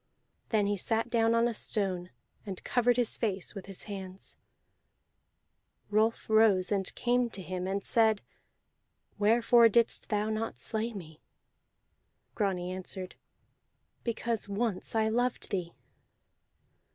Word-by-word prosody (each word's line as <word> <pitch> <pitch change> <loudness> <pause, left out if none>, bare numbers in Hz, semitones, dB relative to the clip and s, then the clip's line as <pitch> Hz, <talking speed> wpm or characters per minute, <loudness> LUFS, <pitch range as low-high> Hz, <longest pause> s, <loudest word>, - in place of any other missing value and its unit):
Then 215 -3 +2
he 205 0 0
sat 225 +4 -1
down 230 -1 +3
on 230 +1 +4
a 240 - -1
stone 190 -5 -1 0.3
and 195 -4 -7
covered 245 -1 +2
his 245 -2 +1
face 195 -5 -2
with 195 -1 -8
his 195 -2 -7
hands. 190 -2 -6 1.5
Rolf 220 +2 +2
rose, 215 -4 +4
and 195 -2 0
came 245 0 +1
to 215 - -8
him, 185 0 -4
and 195 +1 -2
said: 220 -3 +3 1.0
"Wherefore 230 +2 +5
didst 235 +1 +2
thou 210 0 0
not 220 +1 -3
slay 225 +1 -2
me?" 160 -7 -10 1.1
Grani 185 -4 -1
answered: 185 0 -5 0.9
"Because 230 -2 -2
once 205 0 -2
I 220 -1 +3
loved 245 +3 0
thee." 175 -3 -3
215 Hz, 125 wpm, -30 LUFS, 190-230 Hz, 1.5 s, Wherefore